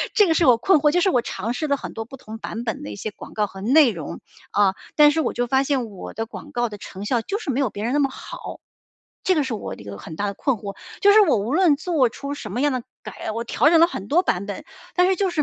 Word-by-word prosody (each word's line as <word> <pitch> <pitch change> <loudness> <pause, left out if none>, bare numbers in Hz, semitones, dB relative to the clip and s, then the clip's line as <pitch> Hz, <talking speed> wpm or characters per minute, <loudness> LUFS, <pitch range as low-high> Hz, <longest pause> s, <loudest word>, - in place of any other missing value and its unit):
这 415 -4 +6
个 325 - +3
是 335 - +3
我 250 -4 +6
困 315 +6 +4
惑， 295 0 +3
就 355 - +2
是 380 - +3
我 245 - +2
尝 220 +5 -3
试 310 - -2
了 280 - +2
很 - - -7
多 225 0 -5
不 270 +3 -11
同 220 -2 -9
版 225 +1 -5
本 225 -2 -4
的 105 - -6
一 - - -6
些 215 - -4
广 - - -12
告 210 -1 0
和 195 0 -11
内 275 +5 +5
容， 165 -6 -7 0.4
嗯。 200 -2 +4 0.2
但 295 -1 +7
是 320 - +1
我 - - -1
就 245 0 -1
发 265 +2 +3
现 270 -3 0
我 195 -3 -9
的 225 - -3
广 - - -10
告 240 -1 0
的 210 - -8
成 195 0 -9
效 240 0 +1
就 400 - -3
是 330 - -6
没 265 - -1
有 270 - +2
别 205 - -6
人 245 - -1
那 295 - +2
么 275 -1 +2
好。 - - -8 0.6
这 370 - +3
个 300 - +2
是 260 -3 -3
我 215 - -5
的 - - -13
一 - - -13
个 100 -1 -7
很 160 - -9
大 205 - -2
的 200 - -3
困 260 +5 0
惑， 200 -1 -7 0.3
就 405 0 +7
是 430 - +8
我 315 - +4
无 220 +7 -2
论 345 -4 +5
做 310 -6 +2
出 280 +5 -6
什 220 -8 -7
么 245 +7 -2
样 290 - +3
的 255 - -2 0.2
改 - - -6
我 230 +2 -3
调 290 +5 +3
整 330 0 +5
了 335 - +8
很 200 - -6
多 345 - +3
版 185 - 0
本。 200 - -6 0.3
但 360 0 +5
是 380 - +3
就 385 0 +1
是 330 -4 0
255 Hz, 330 characters per minute, -23 LUFS, 215-310 Hz, 0.6 s, 是